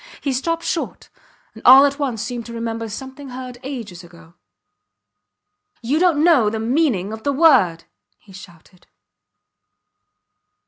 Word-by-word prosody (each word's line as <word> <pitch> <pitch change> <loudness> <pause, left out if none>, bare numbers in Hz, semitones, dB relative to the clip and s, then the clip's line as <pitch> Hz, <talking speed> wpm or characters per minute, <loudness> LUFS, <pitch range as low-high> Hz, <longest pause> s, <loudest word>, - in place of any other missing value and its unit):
He 275 - -2
stopped 330 +6 -2
short, 335 - -4 0.4
and - - -13
all 265 +3 +8
at 280 +1 -2
once 245 -7 -2
seemed 240 -1 -6
to 235 - -9
remember 230 -1 -5
something 265 +5 -9
heard 250 -1 -9
ages 225 -10 -8
ago. 170 -1 -17 1.5
You 275 +7 0
dont 350 -4 +3
know 300 -11 +4
the 220 - -4
meaning 225 - 0
of 220 - -8
the 285 - -1
word, 260 - +3 0.3
he 195 - -19
shouted. 180 -1 -16
245 Hz, 135 wpm, -20 LUFS, 210-280 Hz, 1.5 s, all